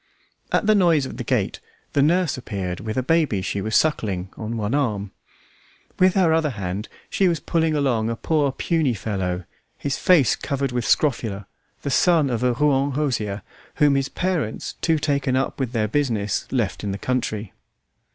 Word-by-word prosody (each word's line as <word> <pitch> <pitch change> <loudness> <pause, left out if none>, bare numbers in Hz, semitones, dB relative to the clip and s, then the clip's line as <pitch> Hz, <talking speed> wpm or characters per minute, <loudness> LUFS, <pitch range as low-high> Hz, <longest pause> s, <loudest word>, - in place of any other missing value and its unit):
At - - +2
the 215 - +5
noise 170 -8 +4
of - - -7
the - - -3
gate - - -1 0.3
the 140 - +3
nurse 170 +2 +2
appeared 95 -8 -4
with 110 +1 -4
a 130 - +1
baby 145 - +1
she 100 +1 -2
was 110 +2 -2
suckling 100 - +1
on 115 +1 -4
one 105 +2 -2
arm. 105 -9 0 0.9
With 185 0 +4
her 180 -5 +4
other 160 -2 +2
hand 100 -2 -4 0.2
she 195 - +2
was 170 -3 +1
pulling 160 +1 0
along 120 -6 +1
a 115 - -1
poor 145 +2 +1
puny 160 +1 0
little 105 - -9
fellow, 95 -4 -2 0.3
his 140 -1 -2
face 165 -9 +4
covered 140 -2 -2
with 125 -2 -2
scrofula, 110 -9 +1 0.4
the 140 - -2
son 155 -1 +3
of 120 -1 -1
a 125 -1 +2
Rouen 140 +1 +2
hosier, 110 -9 -1 0.3
whom 145 -1 +4
his 135 0 0
parents, 175 -12 -2
too 165 -2 +2
taken 140 -3 0
up 135 +2 -1
with 130 -3 -1
their 110 -4 0
business, 110 -6 -1
left 115 -8 -1
in 100 - -2
the 100 - -3
country. 110 -4 -2
130 Hz, 180 wpm, -23 LUFS, 110-150 Hz, 0.9 s, the